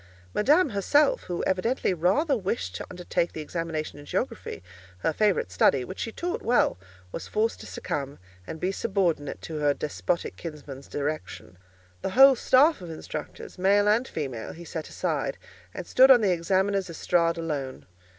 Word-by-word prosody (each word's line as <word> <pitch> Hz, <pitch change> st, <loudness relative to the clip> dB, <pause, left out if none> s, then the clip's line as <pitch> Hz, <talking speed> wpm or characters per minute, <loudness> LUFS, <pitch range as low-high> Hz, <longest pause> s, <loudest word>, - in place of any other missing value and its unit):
Madame 300 Hz, +9 st, +4 dB
herself, 290 Hz, -, +2 dB
who 175 Hz, -1 st, -3 dB
evidently 190 Hz, +3 st, 0 dB
rather 195 Hz, -, +2 dB
wished 95 Hz, -, -3 dB
to 90 Hz, -, -6 dB
undertake 175 Hz, -1 st, -2 dB
the -, -, -6 dB
examination 155 Hz, -1 st, -4 dB
in 145 Hz, -, -12 dB
geography—her 90 Hz, -, -4 dB
favourite 200 Hz, -, +1 dB
study, 125 Hz, +8 st, +3 dB
which 185 Hz, -, -8 dB
she 225 Hz, -, -3 dB
taught 355 Hz, -, -3 dB
well—was 95 Hz, -, -1 dB
forced 220 Hz, +2 st, 0 dB
to -, -, -10 dB
succumb, 140 Hz, -1 st, -4 dB, 0.3 s
and 160 Hz, -, -6 dB
be 185 Hz, +3 st, 0 dB
subordinate 190 Hz, -9 st, -1 dB
to 155 Hz, -2 st, -5 dB
her 145 Hz, -1 st, +2 dB
despotic 165 Hz, +3 st, -2 dB
kinsman's 145 Hz, -4 st, -9 dB
direction. 145 Hz, -9 st, -5 dB, 0.5 s
The -, -, -2 dB
whole 270 Hz, 0 st, +9 dB
staff 265 Hz, -, +4 dB
of 175 Hz, -, -8 dB
instructors, 155 Hz, +2 st, -7 dB
male 200 Hz, +2 st, +4 dB
and 225 Hz, +5 st, +3 dB
female, 130 Hz, -7 st, -5 dB
he 170 Hz, +1 st, -11 dB
set 160 Hz, -1 st, -6 dB
aside, -, -, -2 dB, 0.3 s
and -, -, -7 dB
stood 260 Hz, +1 st, +6 dB
on 250 Hz, -3 st, +8 dB
the 200 Hz, -3 st, +3 dB
examiner's 190 Hz, +2 st, +1 dB
estrade 170 Hz, 0 st, +1 dB
alone. 145 Hz, -5 st, -4 dB
170 Hz, 155 wpm, -26 LUFS, 145-210 Hz, 0.5 s, whole